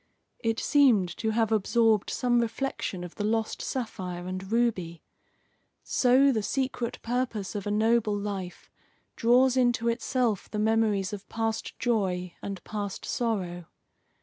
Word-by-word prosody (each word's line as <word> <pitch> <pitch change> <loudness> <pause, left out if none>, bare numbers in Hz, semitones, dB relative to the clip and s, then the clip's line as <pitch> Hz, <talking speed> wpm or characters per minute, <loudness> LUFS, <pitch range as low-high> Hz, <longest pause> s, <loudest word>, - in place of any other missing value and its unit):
It 225 -1 -1
seemed 225 - +3
to 220 - -1
have 225 0 +1
absorbed 220 0 +3
some 245 -1 +1
reflection 230 -5 -3
of 175 - -8
the 205 - -4
lost 220 +1 -1
sapphire 185 -8 -4
and 185 +2 -5
ruby. 200 -8 0 0.8
So 260 +2 +4
the 220 -4 0
secret 255 +1 -2
purpose 235 -5 -2
of 205 -2 -4
a - - 0
noble 220 0 +2
life 200 -3 -5 0.4
draws 250 +2 +4
into 240 -2 +2
itself 235 -2 0
the 215 - -4
memories 210 -2 +1
of 200 -1 -8
past 225 0 -3
joy 185 -7 0
and 195 -2 -6
past 205 -2 -5
sorrow. 185 -7 -2
220 Hz, 135 wpm, -28 LUFS, 195-235 Hz, 0.8 s, So